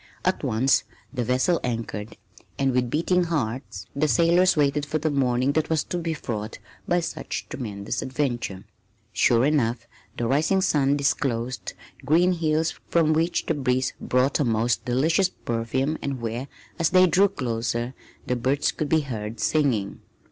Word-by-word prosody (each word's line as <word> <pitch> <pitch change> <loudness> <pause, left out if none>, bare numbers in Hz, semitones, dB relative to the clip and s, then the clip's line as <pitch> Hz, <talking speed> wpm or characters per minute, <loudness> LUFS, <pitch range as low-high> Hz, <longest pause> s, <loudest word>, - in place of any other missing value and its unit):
At - - 0
once 125 +5 +2 0.3
the 125 -3 -1
vessels 130 +8 +2
anchored, 115 -3 -4 0.4
and 135 -1 +2
with 125 -1 +1
beating 175 +5 +1
hearts 125 - -3
the 145 +2 +2
sailors 170 +7 +4
waited 145 0 +2
for 150 +2 -1
the 155 0 -1
morning 130 -1 +1
that 155 +1 0
was 160 -3 +1
to 175 - -3
be 165 -1 -2
fraught 110 -6 -5 0.3
with 175 -1 +1
such - - -5
tremendous 105 -5 -4
adventures. 120 -8 -2 0.5
Sure 120 +3 +4
enough 125 -6 +1 0.3
the 120 - -1
rising 155 +9 +2
sun 145 -6 +2
disclosed 125 -4 -1 0.3
green 175 +5 +4
hills 160 -1 0 0.2
from 160 -2 +3
which 165 +2 0
the - - +1
breeze 130 -3 0
brought 125 +4 +1
a - - +3
most 115 0 +1
delicious 160 +10 +2
perfume 120 +4 -2
and 135 -2 -3
where, 120 +3 -4 0.3
as 165 - +3
they 185 +1 +6
drew 185 +3 +4
closer, 120 - -2 0.3
the 125 - 0
birds 130 +4 +1
could 150 - -3
be 160 -1 +3
heard 110 -5 -5
singing. 130 -10 0
135 Hz, 155 wpm, -25 LUFS, 120-155 Hz, 0.5 s, they